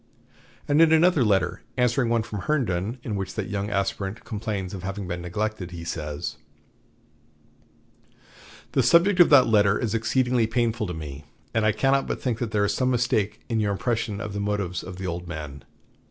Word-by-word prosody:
And 145 +2 +4
in 165 -1 +6
another 160 -3 +5
letter, 100 -3 +1 0.2
answering 125 0 +2
one 115 -1 +2
from 105 -2 -6
Herndon 115 -5 -1
in 110 - -3
which 95 -1 -4
that - - -3
young 100 0 -2
aspirant 100 +1 -2
complains 105 -4 -4
of 95 - -6
having 100 +1 -5
been 90 0 -4
neglected, 100 +1 -3
he 85 -1 -8
says: 75 -3 -4 2.3
"The - - +3
subject 180 +3 +4
of 175 - +8
that 135 -4 +7
letter 105 -2 +4
is 115 -3 -2
exceedingly 120 +1 +1
painful 115 -1 0
to 90 - -5
me; 75 -2 -8 0.3
and 110 -1 +2
I - - +5
cannot 135 +6 +1
but - - -3
think 120 -4 -2
there 110 -4 0
is - - 0
some 130 -1 +1
mistake 120 -4 0
in 115 -2 0
your 105 -1 +1
impression 110 -1 -2
of 105 -2 -5
the 100 - -3
motives 100 -3 -2
of 95 - -8
the 95 - -5
old 90 0 -4
men. 75 -5 -7
105 Hz, 185 wpm, -25 LUFS, 95-120 Hz, 2.3 s, of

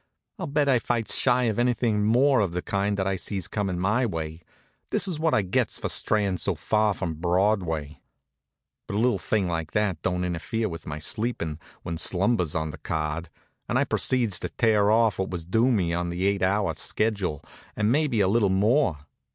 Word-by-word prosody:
"I'll - - -3
bet 145 0 +1
I 130 -3 +4
fights 115 -2 0
shy 125 -1 +3
of 115 -2 0
anything 120 -3 +1
more 130 +5 +4
of 95 -5 0
the 90 - -3
kind 100 +1 -1
that 95 - 0
I 95 0 0
sees 95 -2 -3
comin' 100 -4 -2
my 105 +8 +1
way. 80 -6 -4 0.5
This 195 - +2
is 170 -5 -3
what 160 0 +2
I 105 - +2
gets 90 - 0
for - - -3
strayin' 100 -4 +1
so 95 +3 -1
far 105 +6 +1
from 90 -4 -3
Broadway." 85 -3 0 0.9
But - - -4
a - - +1
little 120 +2 +2
thing 105 -3 0
like 80 -2 -3
that 105 -6 0
don't 90 -1 -1
interfere 90 +6 -2
with 85 -1 -8
my 75 - -4
sleepin', 85 -2 -3 0.2
when 85 -1 -4
slumber's 90 -2 +1
on 80 -1 -1
the 80 - -11
card, 80 +2 -3 0.4
and - - +1
I - - +3
proceeds 115 -8 +1
to - - -4
tear 105 -3 +2
off 110 -1 +3
what 95 - -1
was 85 -3 -5
due 115 +8 +2
me 90 -7 +1
on 85 0 -1
the 90 +2 -2
eight 100 0 +1
hour 95 -2 +1
sched., 95 -2 -2 0.3
and 105 +2 +1
maybe 140 -6 +2
a 95 - +3
little 105 0 +3
more. 100 - +2
100 Hz, 200 wpm, -26 LUFS, 85-115 Hz, 0.9 s, I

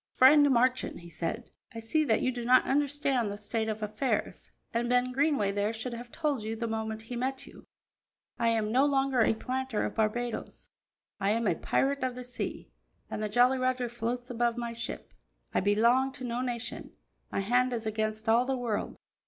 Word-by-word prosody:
"Friend 290 +2 +7
Marchand," 255 -5 +1
he 170 0 -12
said, 170 +9 -4 0.2
"I - - -4
see 265 +8 +1
that - - +2
you 255 - +2
do 240 -1 -5
not 255 +2 +5
understand 280 -5 +1
the 205 - -5
state 220 +2 -2
of 215 0 -3
affairs, 215 +6 -2 0.2
and 235 +1 0
Ben 250 0 +2
Greenway 275 -7 +2
there 205 +2 0
should 230 +2 -5
have 240 +1 -8
told 295 -6 -1
you 220 +1 -3
the 230 +1 -3
moment 220 0 -3
he 245 +2 -7
met 260 +2 -2
you. - - -15 0.7
I 230 -1 +3
am 220 -2 0
no 260 +4 +4
longer 270 -3 +2
a 225 - +3
planter 255 0 -2
of - - -3
Barbadoes; 230 +2 -2 0.5
I 195 0 +1
am 230 +2 +1
a 195 - +3
pirate 275 - 0
of 255 -1 -1
the 250 - -6
sea, 250 0 -6 0.4
and - - -3
the 215 - -1
Jolly 245 +4 +4
Roger 255 -1 0
floats 240 +2 -3
above 240 0 0
my 235 -1 -3
ship. 230 0 -6 0.4
I - - +3
belong 235 +7 +3
to 255 - -9
no 240 0 -2
nation; 245 -2 -4 0.4
my - - 0
hand 250 +5 +2
is 230 -2 -3
against 215 0 -2
all 230 +3 +4
the 265 0 -1
world. 235 -4 -3
240 Hz, 195 wpm, -29 LUFS, 220-255 Hz, 0.7 s, Friend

